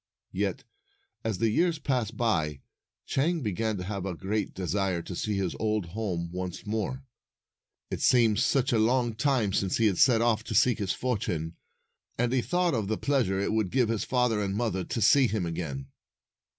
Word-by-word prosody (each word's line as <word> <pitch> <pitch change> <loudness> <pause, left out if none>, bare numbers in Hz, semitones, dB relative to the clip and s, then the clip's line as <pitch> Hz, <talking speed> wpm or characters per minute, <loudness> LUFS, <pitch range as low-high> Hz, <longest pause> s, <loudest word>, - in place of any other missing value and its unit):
Yet, - - -2 0.6
as 110 -4 -1
the 115 +1 +1
years 170 +7 +2
passed 125 -7 -2
by, 80 - 0 0.4
Chang 165 +5 0
began 110 -1 -1
to 90 - -4
have 100 0 -4
a 95 -2 -3
great 100 +3 -2
desire 95 -1 -1
to 90 - -7
see 105 +3 -2
his 95 -3 -1
old 110 -3 0
home 90 -4 -3
once 90 -1 -5
more. 110 +5 -3 0.9
It - - -3
seemed 115 -4 +4
such 135 -2 +2
a 115 - +3
long 120 +1 +2
time 120 -4 +1
since 95 -2 +1
he 115 - +2
had 100 -4 +2
set 120 -2 +5
off 110 -2 +2
to - - -4
seek 125 -3 +4
his 100 -2 -1
fortune, 90 -10 -2 0.6
and 120 +1 +1
he 130 - +3
thought 175 +3 +1
of 110 -5 -1
the 110 +1 -1
pleasure 125 -10 +1
it 100 - 0
would 110 -4 +1
give 125 -1 +2
his 115 -2 0
father 125 -4 +1
and 100 -1 -2
mother 105 -4 -1
to 115 - -3
see 135 +4 +6
him 105 -4 -1
again. 80 -5 -4
110 Hz, 190 wpm, -28 LUFS, 95-120 Hz, 0.9 s, see